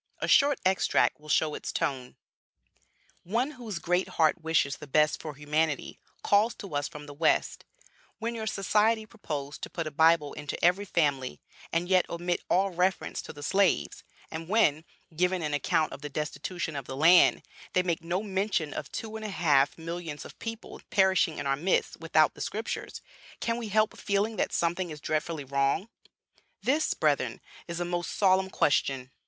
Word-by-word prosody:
A - - -3
short 285 -1 +5
extract 185 -5 +2
will 150 0 -14
show 155 0 +2
its - - -5
tone: 130 -3 -2 1.1
"One 235 - 0
whose 235 - -6
great 180 +2 0
heart 160 +1 +3
wishes 160 -4 +1
the 150 - -10
best 150 +2 +2
for 155 -2 -6
humanity 150 +1 -1 0.2
calls 215 +4 +3
to 195 -6 -9
us 145 0 0
from 150 0 -10
the 145 - -9
West: 155 +2 +1 0.5
'When 230 +1 -3
your 220 -1 -4
Society 215 +2 +2
propose 150 -9 -6
to - - -6
put 165 - -4
a 155 - -4
Bible 160 -1 +4
into 150 -2 -5
every 185 +4 +3
family, 140 - 0 0.3
and 170 +1 0
yet 185 -1 +3
omit 175 +1 -2
all 195 +2 +2
reference 180 +2 0
to - - -9
the 145 -1 -10
slaves; 195 +4 +1 0.3
and 160 +1 -6
when, 165 -8 +3 0.3
giving 180 +1 +1
an 150 -1 -2
account 155 +2 +1
of - - -9
the 150 - -5
destitution 155 +3 -4
of 140 -3 -4
the 130 - -6
land, 170 +4 +6 0.3
they 185 - +3
make 170 -2 -1
no 175 +4 -1
mention 190 -6 -1
of - - -6
two 220 -1 -5
and 220 - -8
a - - -3
half 145 -7 +2
millions 165 -2 -6
of - - -12
people 225 0 -7
perishing 190 -5 +3
in - - -4
our 135 0 +2
midst 175 +7 0
without 155 -1 +3
the - - -11
Scriptures, 220 +2 -4 0.4
can 230 - -1
we 235 -2 -4
help 215 +1 +2
feeling 205 +2 0
that - - 0
something 175 +1 0
is 155 -1 -7
dreadfully 155 0 -2
wrong?' 140 - 0 0.7
This, 300 +4 +1
brethren, - - +1 0.3
is 170 0 -4
a 175 - -1
most 175 0 -2
solemn 190 -1 +3
question. 135 -5 +1
170 Hz, 180 wpm, -28 LUFS, 150-195 Hz, 1.1 s, land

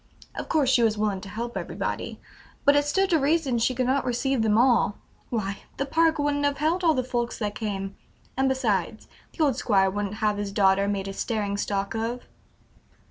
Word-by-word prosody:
Of - - -6
course 290 -5 +3
she 245 - +4
was 220 -2 +2
willing 205 -3 -1
to 195 - -9
help 235 +3 -5
everybody, - - -4 0.5
but 285 - +6
it 290 0 +3
stood 385 +6 +1
to 325 - +4
reason 280 -4 +1
she 250 +3 +1
could 255 +1 0
not 265 +2 +1
receive 255 +1 0
them 215 -1 +3
all; 235 -4 +3 0.3
why, 200 -4 -2 0.2
the 275 - -1
park 325 +3 +2
wouldn't 290 0 0
have 285 0 +1
held 325 +5 0
all 320 -2 +4
the 255 - 0
folks 240 -1 -2
that 210 -2 -2
came, 195 -2 -4 0.4
and 265 +1 +2
besides, 220 -7 -1 0.3
the 320 - +2
old 280 -5 +2
Squire 195 -3 +2
wouldn't 205 0 -3
have 210 -2 0
his 205 -1 -3
daughter 195 -1 +3
made 200 -1 -2
a 195 - -5
staring 205 -1 -2
stock 200 -1 -2
of." 230 +2 -3
235 Hz, 200 wpm, -26 LUFS, 205-275 Hz, 0.5 s, but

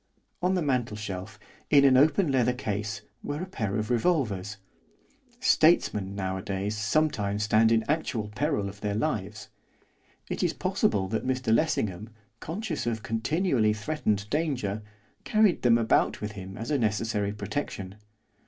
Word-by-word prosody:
On 185 +1 +2
the 180 - 0
mantelshelf, 105 -7 -3 0.3
in 140 -2 +6
an 135 -1 +6
open 155 +4 +4
leather 125 -2 +2
case, 105 -3 -3 0.2
were 145 +4 -4
a - - -3
pair 110 - -3
of 110 +2 -2
revolvers. 110 - 0 0.8
Statesmen, 100 -1 +3
nowadays, 95 +1 -3
sometimes 110 -3 0
stand 110 +1 +4
in 115 -1 +3
actual 145 -8 -1
peril 120 -1 -1
of 100 +1 -9
their 105 -1 -1
lives. 105 -4 -3 0.8
It - - -3
is - - +1
possible 95 -2 0
that 110 +3 -2
Mr 130 -3 +1
Lessingham, 110 - 0 0.3
conscious 170 - -4
of 110 -2 -2
continually 115 - +1
threatened 105 -3 -1
danger, 130 -10 -1 0.4
carried 215 -4 +3
them 120 -2 +5
about 115 -1 +2
with 105 0 -4
him 95 -2 -8
as 115 +5 -5
a 145 - +2
necessary 105 -2 0
protection. 100 -2 -4
110 Hz, 140 wpm, -27 LUFS, 105-145 Hz, 0.8 s, in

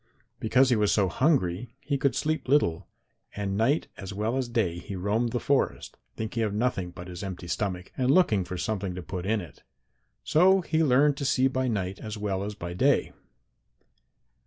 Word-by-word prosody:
Because 125 +2 +3
he - - +5
was 105 -2 +2
so 100 -3 +3
hungry 120 - 0
he 145 - -2
could 140 -1 +1
sleep 155 -3 -1
little, 125 - +2 0.5
and 100 -1 -2
night 120 +9 +1
as 95 -1 -7
well 105 +4 -1
as 130 -2 -1
day 95 -8 0
he 95 +3 -7
roamed 105 +6 0
the 120 - -1
forest, 140 +1 0 0.2
thinking 110 +1 -3
of 105 -2 -1
nothing 105 -6 0
but 90 +1 -10
his 90 -1 -7
empty 95 -3 -6
stomach, 90 0 -3
and 130 -1 0
looking 135 - +4
for 90 +1 -6
something 95 -2 -2
to 90 - -6
put 90 +1 -5
in 110 0 +1
it. 80 -7 -12 0.6
So 190 +4 +4
he 160 -1 +1
learned 140 +1 +4
to 140 - -3
see 130 0 +3
by 130 0 -1
night 95 -5 -2
as 110 -1 -6
well 100 -2 -2
as 105 +1 -5
by 85 -3 -6
day. 90 - +2
110 Hz, 190 wpm, -27 LUFS, 95-130 Hz, 0.6 s, he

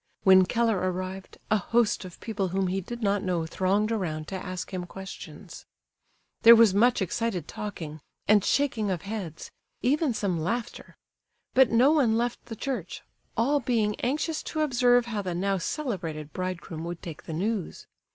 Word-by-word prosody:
When 190 -1 +7
Keller 230 -3 +1
arrived, 185 +1 -6
a 215 - +5
host 225 0 +1
of 180 - -11
people 210 -4 -2
whom 190 +2 0
he 190 +1 -1
did 235 +5 -7
not 200 -1 +2
know 175 -4 -1
thronged 195 +6 +1
around 160 -8 -2
to 195 - -4
ask 185 0 -5
him 180 -1 -4
questions. 190 +2 -10 0.7
There 230 +1 +10
was 225 -4 +6
much 235 +1 +4
excited 190 -3 -2
talking, 160 -7 -6 0.3
and 205 -1 +5
shaking 240 -7 +1
of 180 -4 -2
heads, 195 -6 -6 0.3
even 275 0 +2
some 190 -6 -1
laughter; 230 +9 -4 0.6
but 260 -1 +6
no 245 +5 +5
one 255 -8 +3
left 240 +1 -2
the 225 - -6
church, 220 -7 -4 0.3
all 275 +6 +3
being 225 -5 +1
anxious 300 +5 -1
to 310 - -3
observe 245 -4 +3
how 220 -3 -3
the 180 -3 -3
now 195 +2 0
celebrated 170 - -4
bridegroom 180 -3 -4
would 170 0 -6
take 165 -3 -8
the 160 - -5
news. 195 +2 -2
205 Hz, 165 wpm, -27 LUFS, 185-235 Hz, 0.7 s, There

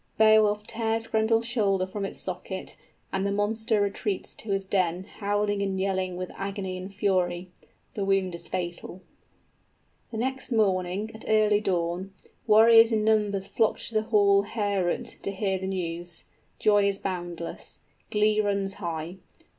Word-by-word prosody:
Beowulf 215 -1 +5
tears 225 0 -1
Grendel's 225 +1 +2
shoulder 200 -6 +1
from 195 +1 -4
its - - -5
socket, 190 +1 -5 0.4
and 195 0 0
the 200 - 0
monster 220 +2 0
retreats 200 -1 -2
to 220 - -8
his 195 -1 0
den, 185 -2 0
howling 205 0 -1
and 195 -1 -1
yelling 190 -2 -1
with 185 0 -5
agony 195 -1 -4
and 185 +2 -7
fury. 185 -3 0 0.4
The 205 - -2
wound 195 -2 +1
is 170 - -6
fatal._ 175 0 -5 1.1
_The 220 - -4
next 265 +2 -2
morning, 195 -1 +1
at 220 - -9
early 215 -1 +4
dawn, 180 0 -2 0.3
warriors 225 +1 +7
in 215 -1 +1
numbers 210 -3 +2
flock 220 +2 +1
to - - -6
the 215 - +3
hall 200 -2 +5
Heorot, 200 -4 -2
to - - -2
hear 195 -1 -1
the 190 - -4
news. 175 -2 -3 0.3
Joy 205 -2 +4
is 200 -1 0
boundless. 175 -3 -5 0.3
Glee 210 0 +3
runs 200 -1 0
high. 170 +1 -4
200 Hz, 150 wpm, -27 LUFS, 185-215 Hz, 1.1 s, warriors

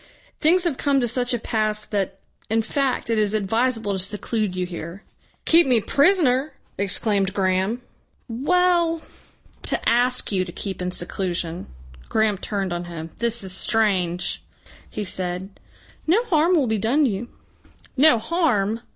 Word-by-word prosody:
"Things 345 +3 +4
have 330 -7 0
come 280 -1 +2
to 245 - +1
such 245 +2 -1
a 240 - +1
pass 215 -1 -1
that, 195 -2 -2 0.3
in 225 +1 +1
fact, 260 0 -1
it 225 - +2
is 210 0 +1
advisable 225 +1 0
to 190 - -2
seclude 210 +1 -2
you 180 0 -1
here." 175 +2 -8 0.4
"Keep 335 -2 +6
me 245 -3 +5
prisoner!" 280 - +2 0.2
exclaimed 200 0 +1
Graham. 190 +5 0 0.4
"Well 335 +6 +1 0.6
to - - -1
ask 245 +1 +2
you 190 -2 +1
to 180 - -8
keep 190 +1 -6
in 180 - -2
seclusion." 175 -1 -3 0.4
Graham 220 -3 +1
turned 195 -3 -3
on 175 0 -4
him. 165 -2 -7
"This 235 -2 0
is 190 - -1
strange!" 185 -5 0 0.5
he 210 - -5
said. 185 +1 -3 0.5
"No 395 +9 +3
harm 340 -3 +3
will 295 -5 +3
be 220 -2 0
done 265 +8 +2
you." 220 -1 -2 0.7
"No 275 -1 +6
harm!" 230 - 0
220 Hz, 150 wpm, -23 LUFS, 190-260 Hz, 0.7 s, Keep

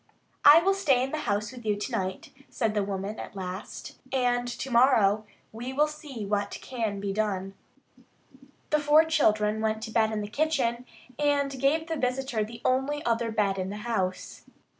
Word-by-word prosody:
"I 305 +4 +9
will 390 +2 +3
stay 290 -11 +2
in 270 - -3
the 310 - -2
house 205 +1 0
with 250 -2 -11
you 210 -1 +1
tonight," 200 -3 -4 0.2
said 225 -4 -1
the 210 - +1
woman 195 +2 -4
at - - -8
last, 185 +1 -7
"and 245 -2 +1
tomorrow 235 -4 +3 0.3
we 245 +4 -6
will 295 +3 +4
see 300 -7 -7
what 205 0 -1
can 225 -5 -3
be 200 0 -3
done." 195 -2 -2 1.2
The 300 - +4
four 300 +2 +5
children 215 -9 +2
went 220 0 -1
to 220 - -6
bed 220 -1 +2
in 215 -1 -2
the 205 - -4
kitchen, 250 -2 0 0.3
and 285 -1 +2
gave 295 +5 +2
the 325 -1 -3
visitor 250 -3 -1
the 230 +2 -9
only 270 +3 0
other 230 0 +1
bed 205 -3 0
in 185 0 -2
the 205 - -5
house. 190 -6 -3
235 Hz, 175 wpm, -27 LUFS, 210-275 Hz, 1.2 s, I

